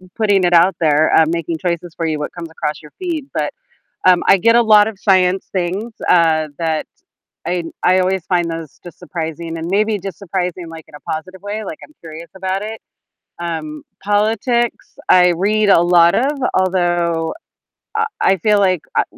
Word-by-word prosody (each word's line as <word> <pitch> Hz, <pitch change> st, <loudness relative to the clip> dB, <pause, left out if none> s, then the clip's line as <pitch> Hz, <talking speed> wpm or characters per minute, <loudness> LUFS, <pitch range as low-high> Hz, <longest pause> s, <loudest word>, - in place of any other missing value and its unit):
putting 205 Hz, -4 st, +2 dB
it 175 Hz, -, +2 dB
out 175 Hz, +3 st, +5 dB
there, 155 Hz, -1 st, +3 dB
um, 160 Hz, -1 st, +4 dB
making 170 Hz, -1 st, -2 dB
choices 170 Hz, 0 st, -3 dB
for 165 Hz, -, -3 dB
you 155 Hz, -1 st, -1 dB
what 150 Hz, -, -4 dB
comes 170 Hz, -2 st, -8 dB
across 155 Hz, -2 st, -4 dB
your 150 Hz, -1 st, -15 dB
feed. 330 Hz, -6 st, -4 dB
But, -, -, -2 dB, 0.5 s
um, 180 Hz, -1 st, +5 dB
I -, -, +6 dB
get 230 Hz, +5 st, +4 dB
a 240 Hz, -, +5 dB
lot 215 Hz, -2 st, +5 dB
of 215 Hz, -3 st, -9 dB
science 190 Hz, -1 st, +2 dB
things, 190 Hz, +5 st, -3 dB
uh, 160 Hz, -3 st, +3 dB
that 160 Hz, -2 st, -1 dB, 0.6 s
I 175 Hz, -1 st, -1 dB, 0.2 s
I 185 Hz, +1 st, +4 dB
always 185 Hz, -1 st, 0 dB
find 175 Hz, -2 st, +1 dB
those 165 Hz, -3 st, -7 dB
just 175 Hz, -, -12 dB
surprising 165 Hz, -1 st, -5 dB
and 165 Hz, -, -5 dB
maybe 210 Hz, +2 st, +1 dB
just 190 Hz, -3 st, -7 dB
surprising, 180 Hz, -2 st, -4 dB
like, 165 Hz, -1 st, -11 dB
in 155 Hz, -, -20 dB
a 150 Hz, -, -10 dB
positive 185 Hz, +4 st, -6 dB
way, 210 Hz, +2 st, -5 dB
like, 165 Hz, -5 st, -7 dB
I'm -, -, -18 dB
curious 160 Hz, +1 st, -10 dB
about 190 Hz, +1 st, -3 dB
it. 220 Hz, +1 st, -6 dB, 0.6 s
Um, 160 Hz, -3 st, -5 dB, 0.2 s
politics 220 Hz, +4 st, 0 dB
I 180 Hz, -1 st, +6 dB
read 210 Hz, +3 st, +1 dB
a 180 Hz, -, +6 dB
lot 175 Hz, -1 st, +4 dB
of, 275 Hz, +4 st, 0 dB, 0.2 s
although 175 Hz, -3 st, 0 dB, 0.6 s
I 445 Hz, 0 st, +1 dB, 0.2 s
I 190 Hz, -, +3 dB
feel 210 Hz, +4 st, +2 dB
like, 185 Hz, -4 st, +2 dB
uh, -, -, +3 dB
180 Hz, 185 wpm, -17 LUFS, 165-200 Hz, 0.6 s, I